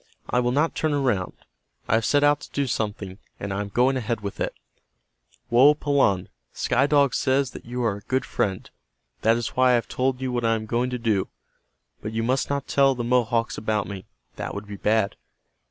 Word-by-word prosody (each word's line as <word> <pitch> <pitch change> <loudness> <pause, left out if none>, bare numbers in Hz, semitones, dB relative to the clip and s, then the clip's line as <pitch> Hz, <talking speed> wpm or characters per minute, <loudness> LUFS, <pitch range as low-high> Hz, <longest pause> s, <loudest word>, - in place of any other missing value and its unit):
I 125 - +1
will 120 0 +1
not 150 +5 +1
turn 155 -1 0
around. 120 -10 0 0.5
I - - +1
have 110 0 +2
set 145 +3 +3
out 145 0 +4
to - - -12
do 140 - 0
something, 105 -5 -3 0.2
and 100 -1 -4
I 100 - -2
am 100 - -5
going 125 +5 +2
ahead 115 -2 -2
with 100 -1 -6
it. - - -2 1.0
Woapalanne, 140 -6 +4 0.2
Sky 135 +3 +1
Dog 145 -3 +3
says 135 0 +1
that - - -11
you 125 +1 -3
are 110 -4 0
a - - -12
good 130 +6 -1
friend. 95 -2 -2 0.5
That 115 +1 +3
is 120 - -2
why 130 0 +3
I 125 - +5
have 120 - -1
told 130 0 -1
you 130 -1 -2
what 120 -1 -1
I 115 0 +3
am 110 -1 -4
going 120 +3 0
to 125 - -3
do. 110 -5 0 0.7
But 110 +1 -5
you 115 0 -1
must 130 +3 0
not 140 -1 -2
tell 135 -1 +3
the 120 - -3
Mohawks 120 -1 +1
about 105 -2 -1
me. 95 0 -7 0.3
That - - -5
would 100 +1 -5
be 105 0 -8
bad. 105 0 +1
120 Hz, 210 wpm, -24 LUFS, 105-130 Hz, 1.0 s, I